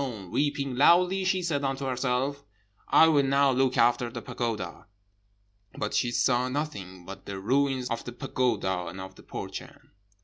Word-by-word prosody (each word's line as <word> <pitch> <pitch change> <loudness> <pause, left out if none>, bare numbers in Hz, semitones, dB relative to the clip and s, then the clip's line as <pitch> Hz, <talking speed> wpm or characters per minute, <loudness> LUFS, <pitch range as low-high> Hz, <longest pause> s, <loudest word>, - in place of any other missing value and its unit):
Weeping 140 -2 0
loudly, 180 +6 +5
she 185 -1 +1
said 150 -5 -1
unto 135 0 -2
herself, 130 +2 -1 0.4
'I 160 - +6
will 145 -3 +4
now 140 0 +3
look 130 0 +1
after 120 0 +3
the - - -7
pagoda.' 110 -7 -4 0.9
But 105 - -3
she 120 - +1
saw 125 +1 +2
nothing 100 - -5
but 100 +2 -10
the 100 -1 -5
ruins 130 +4 +1
of 115 - -2
the 120 - -7
pagoda 115 -8 -1
and 95 - -7
of 95 0 -8
the - - -16
Burchan. - - -8
130 Hz, 160 wpm, -27 LUFS, 115-140 Hz, 0.9 s, I